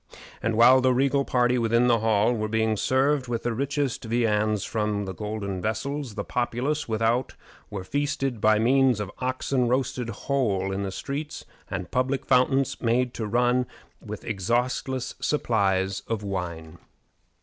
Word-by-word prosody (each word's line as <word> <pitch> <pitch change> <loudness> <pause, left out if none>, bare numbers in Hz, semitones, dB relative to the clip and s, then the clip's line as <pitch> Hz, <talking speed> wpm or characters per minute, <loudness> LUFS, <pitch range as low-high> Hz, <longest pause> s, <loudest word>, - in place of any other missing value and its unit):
And 115 -1 0
while 125 +3 +7
the 130 -1 +3
regal 140 +2 +2
party 125 0 +2
within 115 +1 +3
the 120 -2 +4
hall 110 +1 +2
were 110 -2 -2
being 110 0 +1
served 130 +4 +1
with 115 -1 -3
the 120 - -1
richest 140 +1 -2
viands 110 -3 +1
from 105 -2 -1
golden 100 0 -4
vessels, 115 +4 -3
the 100 - -3
populace 125 +6 -2
without 115 +3 0 0.3
were 100 -2 -5
feasted 135 -1 -2
by 110 0 +5
means 130 +1 +3
of 105 -2 -4
oxen 130 0 0
roasted 125 -1 -1
whole 105 -5 -1
in 95 +1 -2
the 100 -1 -3
streets, 145 +8 -5 0.2
and 95 -4 -5
public 130 +2 0
fountains 130 +1 +2
made 125 +1 +1
to 110 - -4
run 125 +2 +2 0.4
with - - -7
exhaustless 120 +5 -1
supplies 100 -8 +1
of 110 -2 -2
wine. 85 -4 -5
120 Hz, 150 wpm, -26 LUFS, 105-130 Hz, 0.4 s, while